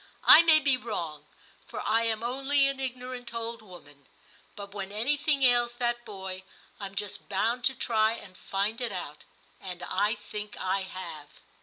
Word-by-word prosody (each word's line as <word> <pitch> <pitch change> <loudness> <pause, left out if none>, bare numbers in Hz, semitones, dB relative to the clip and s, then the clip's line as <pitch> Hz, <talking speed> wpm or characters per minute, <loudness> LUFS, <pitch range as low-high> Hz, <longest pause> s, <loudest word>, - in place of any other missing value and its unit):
I 315 - +10
may 325 -2 +7
be 280 -3 +3
wrong, 165 -11 -5 0.4
for - - -6
I 225 +1 +3
am 225 0 -1
only 275 +3 +2
an 275 -1 -1
ignorant 250 -2 -5
old 230 0 -4
woman; 145 -9 -15 0.5
but 200 -1 -9
when 195 -1 -5
anything 280 +6 +1
ails 240 -1 +4
that 240 0 -1
boy 190 -2 -6 0.4
I'm 195 -1 -6
just 205 0 -4
bound 230 +5 0
to 265 - +3
try 220 -3 +2
and 195 -5 -10
find 205 +7 -2
it 240 -3 -1
out; 165 -6 -7 0.3
and 180 -2 -7
I 210 +4 +1
think 210 -1 -8
I 190 +1 0
have.' 175 -6 -8
220 Hz, 165 wpm, -29 LUFS, 190-245 Hz, 0.5 s, I